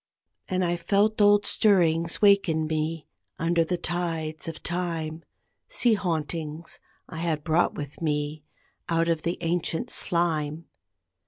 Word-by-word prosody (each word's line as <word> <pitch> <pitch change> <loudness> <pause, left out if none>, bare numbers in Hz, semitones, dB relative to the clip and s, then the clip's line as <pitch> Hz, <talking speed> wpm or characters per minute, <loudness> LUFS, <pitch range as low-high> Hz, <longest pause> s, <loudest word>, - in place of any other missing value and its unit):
And 185 0 0
I 175 0 0
felt 205 +5 +2
old 205 0 +5
stirrings 170 -4 +2
wake 200 -2 +6
in 160 -1 0
me, 155 0 -2 0.3
under 165 +1 +2
the 180 +2 -2
tides 165 -3 -2
of 165 -1 -6
time, 165 -2 -3 0.4
Sea 375 - +2
hauntings 160 -4 -3 0.3
I 160 - -9
had 160 -2 -1
brought 165 +1 +2
with 145 +1 -7
me 150 -1 -1 0.5
out 165 0 +2
of 165 -2 +1
the 170 +2 -2
ancient 170 +6 -1
slime. 165 -3 -1
165 Hz, 135 wpm, -26 LUFS, 155-175 Hz, 0.5 s, wake